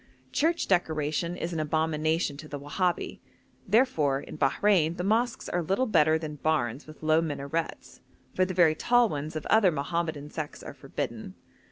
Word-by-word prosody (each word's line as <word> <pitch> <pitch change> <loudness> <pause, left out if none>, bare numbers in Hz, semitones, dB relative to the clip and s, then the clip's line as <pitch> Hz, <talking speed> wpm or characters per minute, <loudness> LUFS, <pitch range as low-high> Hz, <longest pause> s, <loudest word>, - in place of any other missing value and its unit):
Church 330 +5 +1
decoration 170 -1 0
is 170 +1 -4
an 165 - -2
abomination 155 0 0
to 155 - -9
the 145 -1 -6
Wahabi; 175 +5 -2 0.5
therefore, 185 - +3
in - - -9
Bahrein 165 +3 +2
the 180 - -2
mosques 230 +4 0
are 175 - -1
little 195 +10 0
better 160 -8 +4
than 155 -2 -6
barns 140 -3 -1
with 155 0 -13
low 155 +1 +4
minarets, 160 +1 -4 0.3
for 185 - +2
the 185 0 -2
very 170 -3 +5
tall 240 +7 +3
ones 150 +1 -4
of 155 - -4
other 215 -5 +4
Mohammedan 155 0 -3
sects 155 -2 -6
are - - -8
forbidden. - - -6
160 Hz, 165 wpm, -28 LUFS, 150-185 Hz, 0.5 s, very